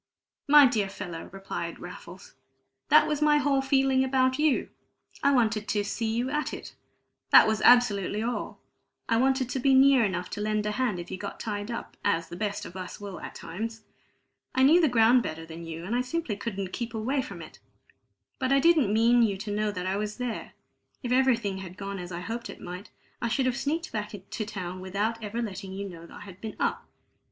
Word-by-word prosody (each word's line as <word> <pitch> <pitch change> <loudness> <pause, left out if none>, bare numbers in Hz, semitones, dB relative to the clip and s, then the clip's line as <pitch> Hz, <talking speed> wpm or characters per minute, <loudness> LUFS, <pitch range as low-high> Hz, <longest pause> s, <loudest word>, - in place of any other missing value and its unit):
"My 295 0 +9
dear 215 -6 +1
fellow," 180 -4 -7
replied 195 +1 -5
Raffles, - - -11 0.6
"that - - +7
was 300 -1 -1
my 300 0 +5
whole 285 -2 +2
feeling 270 -1 +3
about 260 0 +2
you. 300 -3 +2 0.5
I 280 - +4
wanted 220 -5 +2
to 205 -1 0
'see 220 +2 -2
you 240 +3 -1
at 300 +1 -1
it' - - -10 0.6
that - - +9
was 220 -1 0
absolutely 215 -4 +4
all. 240 +1 -3 0.5
I 230 - +2
wanted 265 +1 +2
to 265 - -1
be 270 +1 +4
near 265 -2 +6
enough 185 -3 -1
to 205 - -4
lend 215 0 0
a 210 - 0
hand 215 -5 -1
if 175 - -8
you 185 - -5
got 200 - -6
tied 205 -1 -4
up, 235 - -6
as 165 -4 0
the - - -7
best 205 +1 -3
of 175 - -10
us 185 +2 -7
will 200 -2 -7
at - - -8
times. 220 +6 -6 0.7
I 260 - +4
knew 320 +6 +6
the 315 - +4
ground 240 +1 +5
better 160 -5 -5
than 165 +1 -9
you, 165 +1 -6
and 220 +6 -2
I 245 - +2
simply 255 -3 -2
couldn't 195 -3 -5
keep 235 -1 -4
away 260 +6 0
from 265 - -8
it. - - -11 0.8
But 260 -1 0
I 275 - +5
didn't 310 -8 +4
mean 230 +3 +4
you 205 -4 +2
to 205 +2 -5
know 215 0 0
that 180 -2 -5
I 190 +1 0
was 210 0 -3
there; 250 -2 -4 0.5
if 245 - -3
everything 235 -7 +2
had 185 -1 -9
gone 200 -1 -5
as 175 0 -7
I 170 0 -5
hoped 230 +5 -5
it - - -9
might, 180 +4 -8 0.3
I 235 - 0
should 240 +3 0
have 255 -1 +1
sneaked 320 +6 -2
back 210 -1 -4 0.2
to 215 - -3
town 185 -3 -5
without 210 +5 -2
ever 225 +3 -3
letting 195 -3 -6
you 200 +1 -4
know 170 -2 -10
I - - -11
had 195 -2 -12
been 220 -1 -6
up. - - -1
220 Hz, 215 wpm, -27 LUFS, 195-260 Hz, 0.8 s, My